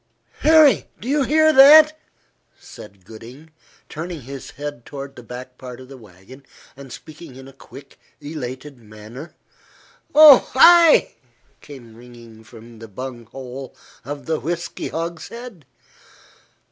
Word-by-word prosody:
"Harry! 310 -1 +3
Do 235 - -10
you 290 +2 0
hear 315 +3 +2
that?" 305 +3 +7 0.6
said 100 -3 -15
Gooding, 125 - -14 0.4
turning 165 0 -8
his 135 +2 -10
head 145 -3 -9
toward 135 0 -10
the 120 - -12
back 125 +2 -12
part 125 -1 -11
of 130 0 -15
the 135 - -12
wagon, 110 +4 -17 0.3
and 135 -1 -14
speaking 155 0 -13
in 135 0 -13
a 135 - -15
quick, 135 +1 -16 0.2
elated 145 -2 -9
manner. 110 +7 -13 0.8
"Oh, 300 -4 +7
ay!" 335 +3 +5 0.5
came 120 -6 -14
ringing 115 -2 -16
from 115 0 -16
the 115 - -11
bunghole 125 +3 -10 0.3
of 145 +2 -8
the 160 -1 -3
whisky 170 +1 -6
hogshead. 170 - -8
135 Hz, 125 wpm, -19 LUFS, 120-170 Hz, 0.8 s, that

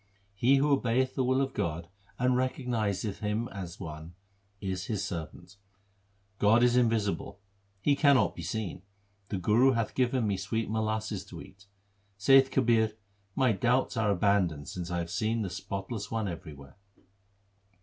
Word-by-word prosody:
He 120 +7 +3
who 145 +2 +2
obeyeth 130 -1 +1
the 130 - 0
will 130 +2 +2
of 135 - -2
God 85 0 -3 0.3
and 125 +1 +2
recognizeth 115 -6 -1
Him 105 +3 -1
as 95 -2 -7
one, 80 -1 -8 0.4
is 95 -2 -3
His 105 -4 -2
servant. 85 +2 -7 0.8
God 115 +4 +5
is 125 0 +4
invisible; 110 -4 0 0.4
He 140 +7 +3
cannot 140 -8 +4
be - - -7
seen; 95 +2 -4 0.5
the 100 - -2
Guru 115 +9 +4
hath 115 -2 -1
given 125 -2 +1
me 100 -2 0
sweet 110 +3 -2
molasses 110 -2 -2
3 - - -9
to - - -13
eat. 100 +1 -23 0.5
Saith 135 +6 +6
Kabir, 115 -4 +2 0.4
my 130 -3 +3
doubts 125 +7 +1
are 110 -2 +1
abandoned 95 -6 +1
since 90 -1 -5
I 90 - -2
have 85 0 -3
seen 110 +3 0
the 95 - -4
Spotless 100 +3 -5
One 110 -2 -2
everywhere. 75 -5 -9
110 Hz, 155 wpm, -29 LUFS, 95-125 Hz, 0.8 s, Saith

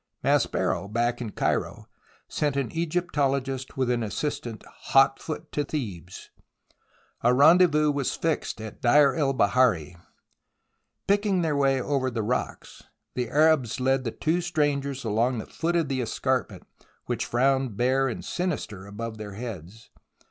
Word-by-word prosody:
Maspero, 85 +3 +1
back 120 +2 0
in 115 - -4
Cairo, - - -2 0.4
sent 145 -2 -1
an 135 -5 -1
Egyptologist 140 -6 -1
with 130 -2 +1
an 120 -1 0
assistant 115 +1 -4
hot 135 0 +2
foot 155 0 -6
to 145 - -1
Thebes. 100 - -6 0.9
A 120 +1 +3
rendezvous 150 +1 +5
was 140 -2 -1
fixed 165 -7 -2
at 110 -1 -9
Deir 140 +3 +5
el 145 -4 +1
Bahari. 100 - +2 1.1
Picking 200 -2 +2
their 155 -3 0
way 135 -1 +2
over 130 0 0
the 115 -3 -3
rocks, 120 +4 -3 0.3
the 125 -2 -2
Arabs 145 -5 +3
led 130 0 +1
the 120 - -2
two 160 +9 -1
strangers 145 -5 -1
along 115 +3 +1
the 110 - -5
foot 170 +1 -2
of 165 -3 +1
the 135 -2 -1
escarpment 115 - -2 0.4
which - - -2
frowned 130 -2 +1
bare 130 +2 +2
and 120 - -5
sinister 125 - -3
above 110 +2 -6
their 105 -2 -7
heads. 110 -1 -8
130 Hz, 140 wpm, -26 LUFS, 115-150 Hz, 1.1 s, rendezvous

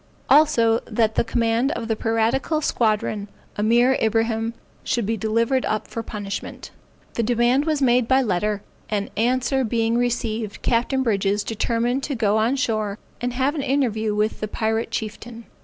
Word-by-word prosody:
Also 235 -6 +5
that 220 -1 +1
the - - +2
commander 230 +3 +1
of 225 - -4
the 225 - 0
piratical 225 +8 0
squadron, 215 -6 0 0.3
Ameer 235 +5 +3
Ibrahim, 225 +1 0 0.3
should 235 -3 -1
be 225 +3 0
delivered 230 +5 +1
up 215 - -2
for 230 - -5
punishment. 205 -3 -6 0.4
The - - -1
demand 240 +4 +2
was 305 -3 0
made 245 -2 +3
by 265 +1 +4
letter, 210 0 -1 0.3
and 205 -2 -2
answer 255 +4 +1
being 230 0 +1
received, 230 -3 -2
Captain 245 +3 +1
Brydges 205 -3 +1
determined 235 +3 0
to 285 - -3
go 215 -2 +2
on 225 +5 +2
shore 215 -6 -1 0.2
and 245 0 -2
have 265 +3 +1
an 305 - -2
interview 235 -6 0
with 210 +1 0
the 215 - -3
Pirate 220 +1 -1
Chieftain. 230 +1 -6
230 Hz, 155 wpm, -22 LUFS, 215-245 Hz, 0.4 s, Also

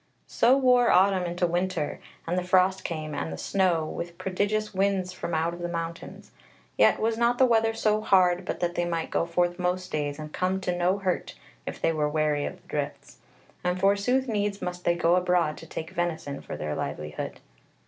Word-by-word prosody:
So 255 +3 +3
wore 250 -2 +4
autumn 190 0 +4
into 175 +1 0
winter, 175 -2 -1 0.3
and 170 - -1
the 180 - 0
frost 185 +1 +3
came, 155 -2 -4
and 80 - -3
the 80 - -5
snow, 175 - +1
with 170 +2 -6
prodigious 205 +4 -1
winds 190 -1 0
from 170 -2 -4
out 165 +2 0
of 175 - -8
the 175 - -3
mountains: 170 -1 -6 0.4
yet 110 +1 +4
was 225 +1 0
not 240 +1 +3
the 260 - +6
weather 225 -2 +2
so 215 -1 +1
hard 185 -3 +3
but - - -4
that 175 -1 0
they 175 - 0
might 165 -1 -2
go 170 - 0
forth 175 +1 0
most 180 +1 -1
days, 145 -1 -2
and 155 -1 -8
come 185 +1 0
to 180 -1 -1
no 180 +2 +2
hurt 190 -3 -2 0.3
if - - -5
they - - +2
were 150 -1 0
wary 150 -1 +1
of - - -6
the - - -27
drifts; - - -5 0.4
and 180 0 0
forsooth 205 +7 +2
needs 205 -2 -1
must 180 -1 -5
they 170 - +3
go 175 0 +3
abroad 180 -4 +2
to - - -11
take 160 +2 -6
venison 170 -6 -3
for - - -7
their 75 0 -3
livelihood. 75 0 -5
180 Hz, 200 wpm, -27 LUFS, 165-195 Hz, 0.4 s, the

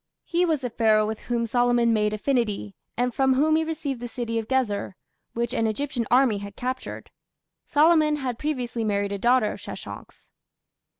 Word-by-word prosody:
He 350 +1 +1
was 310 -4 +1
the 250 -2 -3
Pharaoh 215 -2 +3
with 220 0 -4
whom 235 -1 -1
Solomon 240 0 +2
"made 210 -1 +2
affinity", 215 - -1 0.2
and 245 0 0
from 265 0 +3
whom 310 +4 +3
he 320 - +2
received 295 -5 -3
the 240 - -5
city 230 -1 -3
of 220 - -6
Gezer, 225 -7 -1 0.4
which 235 +1 -2
an 225 -4 +1
Egyptian 240 0 -2
army 245 -5 +4
had 200 0 -8
captured. 255 +1 -5 0.6
Solomon 305 0 +4
had 255 -5 -4
previously 250 -6 -2
married 200 -1 0
a 200 - -3
daughter 240 -1 +3
of - - -8
Sheshonk's. - - -10
245 Hz, 175 wpm, -25 LUFS, 220-270 Hz, 0.6 s, army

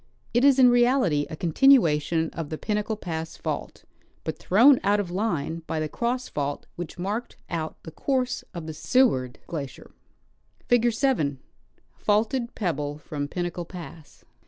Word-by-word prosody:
It 240 +2 +3
is 275 -1 +6
in 250 -2 +7
reality 240 - +3
a - - -5
continuation 165 - +3
of 160 -3 -5
the 155 - -4
Pinnacle 210 +3 -1
pass 165 -5 -5
fault, - - -5 0.4
but - - -4
thrown 245 +8 +6
out 205 +1 +3
of 185 -4 -3
line 170 -5 -1
by 160 - -2
the 155 - -1
cross 245 +8 -2
fault 145 -1 -3
which 175 0 -7
marked 205 +7 -4
out 160 -2 -3
the 160 - -9
course 255 - -1
of 170 -4 -7
the 160 - -5
Seward 155 - +2
glacier. 145 -5 -7 0.8
Figure 240 0 +4
7 225 - +1 0.3
— - - -39
Faulted 235 +4 0
Pebble 150 -7 -2
from 145 -1 -5
Pinnacle 175 +2 -3
Pass. 170 -3 -11
175 Hz, 155 wpm, -26 LUFS, 155-240 Hz, 0.8 s, in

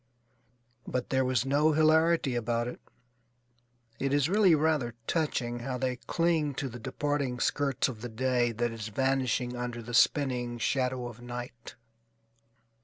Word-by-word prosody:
But 125 -1 -2
there 130 -1 +3
was 130 -2 +1
no 145 +3 +3
hilarity 160 -2 +3
about 120 0 -1
it. 125 - -7 1.2
It 135 +1 +1
is 145 +1 +2
really 195 -4 +5
rather 150 -6 +1
touching 120 -7 -1
how 125 +1 -3
they 125 0 -1
cling 160 -1 0
to 135 - -2
the 120 +1 -9
departing 140 0 -2
skirts 140 -2 +1
of 115 -5 -7
the 120 - -5
day 120 +1 +1
that 120 +1 -1
is 115 -2 -6
vanishing 130 +1 0
under 120 -1 -4
the 120 +2 -8
spinning 125 -2 +2
shadow 125 +1 0
of 120 -1 -8
night. 120 -1 -8
125 Hz, 145 wpm, -29 LUFS, 120-145 Hz, 1.2 s, really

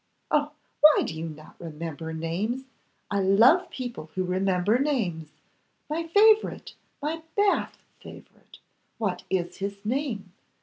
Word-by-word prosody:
'Oh! 295 0 +2 0.3
why 305 0 +7
do - - -4
you 165 +1 -4
not 155 0 -13
remember 160 -1 -6
names! 175 +11 -2 0.5
I 200 - +1
love 210 - +5
people 240 -11 -6
who 185 - 0
remember 185 +4 +1
names. 195 - -1 0.6
My 330 +2 -2
favourite, 425 +5 +4 0.3
my 320 +2 -2 0.2
Bath 405 -1 +2 0.2
favourite. - - -14 0.4
What 190 -6 -2
is 175 -2 -1
his 200 +1 -5
name? 220 -6 -2
200 Hz, 125 wpm, -26 LUFS, 175-290 Hz, 0.6 s, why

